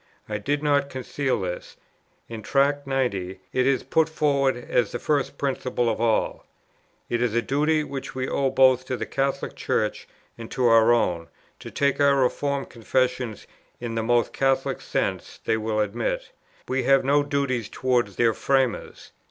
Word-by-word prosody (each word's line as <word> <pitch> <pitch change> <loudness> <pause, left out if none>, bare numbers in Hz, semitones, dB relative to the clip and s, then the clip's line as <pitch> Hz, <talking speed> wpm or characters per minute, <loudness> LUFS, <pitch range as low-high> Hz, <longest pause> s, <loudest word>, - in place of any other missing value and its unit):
I 105 -1 -3
did 145 +8 -1
not 140 -1 +2
conceal 130 0 -2
this: 90 -1 -5 0.5
in 115 -1 -7
Tract 140 +6 +1
90, 100 -9 -1
it 130 0 +2
is 135 -3 +2
put 160 0 +2
forward 140 -4 +1
as 120 -2 0
the - - -3
first 145 +1 -1
principle 130 -3 -1
of 110 - -3
all, 115 -2 +1 0.6
"It 120 0 -1
is 120 -2 0
a 120 - +3
duty 150 +4 +1
which 135 -3 -6
we 130 0 -2
owe 135 -1 +1
both 130 -1 +4
to 130 -1 -3
the - - -3
Catholic 135 0 -2
Church, - - -1 0.3
and 115 - -8
to 130 - -1
our 115 0 +6
own, 90 -8 +1 0.3
to - - -8
take 140 0 0
our 140 -1 +5
reformed 140 +1 0
confessions 125 -1 -1 0.3
in 120 -1 -4
the 115 - -1
most 120 0 +1
Catholic 135 -1 0
sense - - -3
they - - +2
will 110 -1 -1
admit: 105 +3 -2 0.4
we 130 +1 0
have 135 +1 +3
no 145 +2 +4
duties 140 -6 -1
towards 120 -6 0
their 115 -2 +3
framers." 130 -1 -1
130 Hz, 170 wpm, -24 LUFS, 115-140 Hz, 0.6 s, our